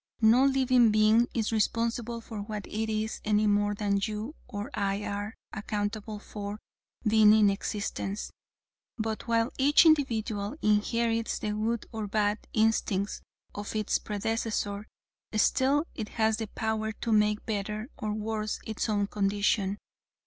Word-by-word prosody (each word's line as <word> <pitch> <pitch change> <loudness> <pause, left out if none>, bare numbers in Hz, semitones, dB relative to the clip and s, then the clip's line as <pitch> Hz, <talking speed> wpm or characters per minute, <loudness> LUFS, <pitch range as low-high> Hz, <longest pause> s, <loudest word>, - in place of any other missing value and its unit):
No 235 +5 +6
living 260 -3 +4
being 215 +2 +4
is 225 -2 0
responsible 230 +1 0
for 220 -2 -7
what 210 -1 -5
it 220 +1 -3
is 215 0 -2
any 210 0 +2
more 205 0 +2
than 200 -1 0
you 215 +6 -3
or 205 +7 -5
I 200 -1 -1
are 205 +2 -4 0.2
accountable 210 0 -3
for 205 0 -7 0.5
being 215 -1 +6
in 210 -2 +5
existence. 200 0 -3 0.7
But 220 0 -3
while 230 +1 +2
each 290 +4 +6
individual 230 -6 +2
inherits 225 +2 +1
the 210 - -3
good 220 +2 -1
or 220 -3 -4
bad 210 +1 +1
instincts 215 -3 +1 0.3
of 205 +1 -6
its 215 -1 +1
predecessor, 210 -1 -2 0.5
still 270 +7 +3
it 215 -2 -5
has 220 -1 +1
the 220 -1 -4
power 220 0 -2
to 230 +2 -4
make 210 0 +2
better 215 +2 -3
or 215 - -3
worse 215 0 -2
its 220 +1 -3
own 205 -1 +1
condition. 200 0 0
215 Hz, 140 wpm, -29 LUFS, 205-225 Hz, 0.7 s, No